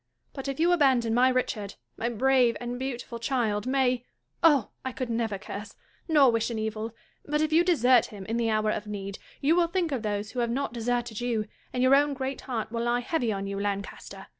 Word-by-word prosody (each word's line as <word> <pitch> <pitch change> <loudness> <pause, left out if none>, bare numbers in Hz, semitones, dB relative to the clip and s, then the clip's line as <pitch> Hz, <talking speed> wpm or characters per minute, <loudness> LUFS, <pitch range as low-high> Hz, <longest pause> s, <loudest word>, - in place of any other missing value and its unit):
But 270 -1 -6
if 275 +2 -3
you 340 +2 +4
abandon 260 -9 +3
my 250 +2 +5
Richard, 250 -5 -1 0.2
my 235 - -2
brave 250 0 +3
and 245 0 -4
beautiful 245 -2 -5
child, 230 -3 0
may 255 -2 +2 0.2
— - - -45
Oh! 275 -7 0
I 260 - -3
could 250 -1 -4
never 225 -3 -1
curse, 200 +2 -8 0.3
nor 290 -6 +6
wish 230 0 0
an 230 - -3
evil; 220 +1 -3 0.3
but, 300 +1 -1
if 310 0 +1
you 335 +2 +6
desert 255 -9 +4
him 200 -3 -9
in 225 +3 -2
the 230 -1 +1
hour 215 0 +1
of 210 0 -4
need, 200 -1 -5 0.2
you 300 +4 +4
will 345 -1 +3
think 345 -2 -1
of 265 -4 -1
those 210 -1 -2
who 250 - -4
have 235 -1 +1
not 265 +1 -2
deserted 240 -1 -2
you, 235 -3 0 0.3
and 250 0 0
your 260 +1 +5
own 285 0 +4
great 265 +1 -4
heart 230 -5 -4
will 235 0 -2
lie 240 +1 +1
heavy 245 -3 0
on 195 -1 -3
you, 195 0 -4
Lancaster 200 0 -4
240 Hz, 220 wpm, -27 LUFS, 220-270 Hz, 0.3 s, nor